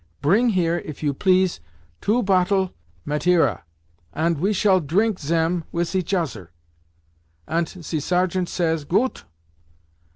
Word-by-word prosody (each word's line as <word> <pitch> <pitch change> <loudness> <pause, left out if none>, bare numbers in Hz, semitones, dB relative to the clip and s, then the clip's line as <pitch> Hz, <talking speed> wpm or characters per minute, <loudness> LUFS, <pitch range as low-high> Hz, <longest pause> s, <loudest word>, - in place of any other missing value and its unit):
Pring 210 +12 +3
here, 175 -5 +1
if 155 -2 -9
you 145 -2 +1
please, 185 - +2 0.4
two 235 +4 +1
pottle 190 -1 +2 0.3
Mateira, 160 +4 +2 0.5
ant 165 -1 0
we 195 +6 +1
shall 190 -2 +3
trink 190 +7 +1
zem 165 +3 0
wis 170 +1 -2
each 190 0 -1
oser.' 135 - -3 1.0
Ant 165 0 0
ze 170 -3 -5
sergeant 180 +3 0
says, 165 -3 0
'Goot! 205 - 0
175 Hz, 125 wpm, -22 LUFS, 160-190 Hz, 1.0 s, Pring